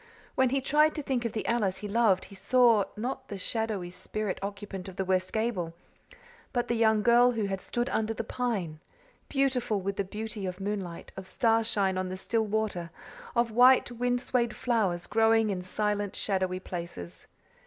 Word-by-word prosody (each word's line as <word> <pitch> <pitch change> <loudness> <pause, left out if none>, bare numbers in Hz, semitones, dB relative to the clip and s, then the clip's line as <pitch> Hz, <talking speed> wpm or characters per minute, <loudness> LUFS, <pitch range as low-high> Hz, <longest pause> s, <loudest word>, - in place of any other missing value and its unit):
When 260 -1 +3
he 270 +1 0
tried 300 +3 +3
to 300 - -3
think 255 -3 -1
of 230 - -2
the 220 - -3
Alice 210 -6 +1
he - - -2
loved 205 -3 +3
he - - -14
saw, 225 +1 +4
not 260 +4 -4
the 200 - -6
shadowy 205 -3 -2
spirit 210 +1 -4
occupant 200 -1 -6
of 185 - -11
the 190 - -2
west 185 0 +1
gable, 215 -7 -1 0.8
but 245 -2 0
the - - 0
young 220 -2 +3
girl 240 +1 +5
who 220 -3 -1
had 195 -1 -3
stood 240 0 -2
under 220 0 0
the 225 - -3
pine, 215 -10 -2 0.5
beautiful 255 -6 +1
with 195 +1 -3
the 200 - +1
beauty 210 0 -5
of 180 +1 -5
moonlight, 195 -4 -4
of 195 -1 -8
starshine 215 -5 +2
on 185 0 -3
still 220 +3 0
water, 205 -5 -1 0.5
of 235 -1 +2
white, 250 +2 +6
wind 245 +1 0
swayed 240 -4 0
flowers 200 -8 0
growing 225 -1 +3
in 185 -2 -2
silent, 205 +2 -1
shadowy 185 -2 -1
places. 170 - -7
215 Hz, 175 wpm, -29 LUFS, 190-235 Hz, 0.8 s, white